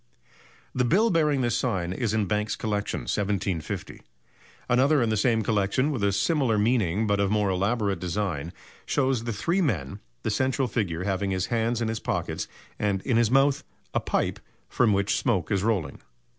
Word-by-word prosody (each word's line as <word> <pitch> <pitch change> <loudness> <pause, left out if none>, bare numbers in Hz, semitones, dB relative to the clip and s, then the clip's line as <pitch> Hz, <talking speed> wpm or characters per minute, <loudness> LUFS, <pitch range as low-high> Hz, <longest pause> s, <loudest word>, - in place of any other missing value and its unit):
_ - - -32 0.4
The 125 - +1
bill 205 - +3
bearing 150 -5 +2
this 120 -2 +1
sign 95 -8 -1
is 115 +1 -1
in 110 -2 +1
Banks's 105 +2 -1
Collection, 105 -1 -2
1750. 100 -5 -2 0.7
Another 135 +5 +4
in 120 -3 +1
the - - +2
same 110 +1 +2
collection, 105 +7 +1
with 125 -8 -2
a 100 - +3
similar 120 - +1
meaning 105 -3 +2
but 100 -1 +1
of 100 -1 +2
more 105 -2 +1
elaborate 100 +2 0
design, 90 -4 -2 0.4
shows 130 -4 +1
the 120 - -1
three 170 - 0
men, 90 - -1 0.2
the - - 0
central 130 +3 +1
figure 90 -7 -2
having 95 0 -1
his 95 0 0
hands 115 +1 0
in - - -1
his 110 0 -2
pockets - - -3 0.3
and 100 -2 0
in 120 -4 +1
his 115 -2 +3
mouth 135 +2 +3 0.3
a - - +2
pipe - - -1 0.3
from 120 -4 +2
which 100 +1 +1
smoke 95 -10 0
is 100 -2 +2
rolling. 95 -10 -1
105 Hz, 180 wpm, -26 LUFS, 100-125 Hz, 0.7 s, Another